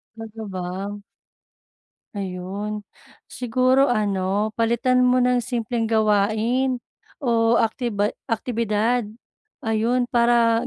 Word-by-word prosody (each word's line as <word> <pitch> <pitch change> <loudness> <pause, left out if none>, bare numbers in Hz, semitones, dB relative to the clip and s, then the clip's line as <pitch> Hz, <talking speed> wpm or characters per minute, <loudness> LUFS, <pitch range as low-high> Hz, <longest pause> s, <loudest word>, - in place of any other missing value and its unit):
Talaga 225 0 -8
ba? 190 +3 -4 1.2
Ayun. 200 +2 -4 0.5
Siguro 255 +2 +2
ano, 205 -2 0
palitan 235 +2 +2
mo 250 0 +4
ng 250 0 +3
simpleng 235 -1 -2
gawain 220 +4 +1 0.4
o 230 -2 +3
aktiba 220 -2 0 0.2
aktibidad, 230 0 0 0.6
ayun. 235 +3 0
Para 235 -1 +3
225 Hz, 85 wpm, -23 LUFS, 210-245 Hz, 1.2 s, mo